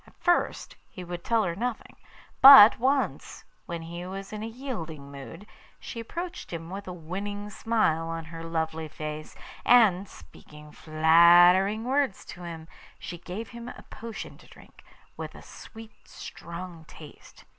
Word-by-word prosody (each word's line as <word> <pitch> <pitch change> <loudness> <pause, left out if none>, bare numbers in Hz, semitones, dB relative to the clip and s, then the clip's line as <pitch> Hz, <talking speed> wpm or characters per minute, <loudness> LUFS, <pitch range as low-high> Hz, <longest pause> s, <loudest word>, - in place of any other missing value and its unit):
At - - -20
first 350 -1 0
he 185 - -9
would 175 0 -7
tell 230 -2 +1
her 170 -3 -2
nothing; 235 +3 -5 0.5
but 265 -6 +10
once, 255 - -1 0.2
when 170 -1 -5
he 170 +2 -7
was 195 +2 -8
in 210 - -5
a 220 - -4
yielding 175 - -7
mood, 140 +7 -10 0.3
she 230 - -8
approached 345 +10 -7
him 165 0 -7
with 195 +1 -7
a - - -5
winning 200 +5 -6
smile 195 -8 0
on 165 0 -5
her 165 +1 -9
lovely 160 -1 -3
face, 155 0 -7 0.3
and, 205 -6 +4
speaking 150 0 -15
flattering 175 +7 +5
words 265 -3 -1
to 175 - -13
him, 165 -2 -8 0.3
she 175 - -8
gave 190 +6 -7
him 235 0 -9
a - - -11
potion 230 -1 -8
to - - -18
drink, - - -18 0.3
with - - -7
a - - -13
sweet, 225 0 -13
strong 170 -1 -9
taste. 155 -2 -15
180 Hz, 155 wpm, -27 LUFS, 165-225 Hz, 0.5 s, but